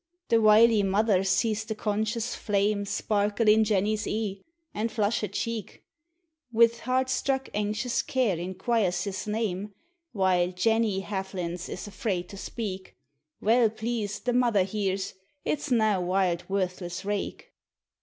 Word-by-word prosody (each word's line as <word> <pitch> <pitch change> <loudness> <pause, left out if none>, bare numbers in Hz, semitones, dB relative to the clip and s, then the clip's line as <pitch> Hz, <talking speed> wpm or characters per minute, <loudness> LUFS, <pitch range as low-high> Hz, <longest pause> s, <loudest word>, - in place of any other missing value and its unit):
The 230 -1 +4
wily 215 0 +6
mother 200 0 +2
sees 215 +3 +1
the 220 0 -4
conscious 215 +2 -1
flame 205 0 0
Sparkle 210 +2 0
in 215 +1 +6
Jenny's 210 0 0
e'e, 205 -3 -2 0.3
and 220 +2 -2
flush 215 0 +1
her 210 - -1
cheek; 220 +2 -4 0.7
Wi' 230 0 +6
heart 255 +1 +1
struck 265 0 -1
anxious 215 +3 0
care 260 -9 +1
inquires 185 +2 0
his 200 0 -4
name, 210 -2 -2 0.4
While 185 -3 +2
Jenny 210 +1 +1
haftlins 185 -3 -4
f - - -8
is 180 - -6
afraid 195 -5 -3
to 200 - -9
speak; 190 -3 -6 0.5
Weel 230 +1 +4
pleased 220 -2 -4
the 245 - +1
mother 235 -6 +3
hears 195 -1 -2 0.3
it 295 - 0
's 295 - -5
nae 220 -5 +3
wild, 180 -1 0
worthless 185 -1 -2
rake. 205 0 -4
210 Hz, 140 wpm, -27 LUFS, 190-225 Hz, 0.7 s, wily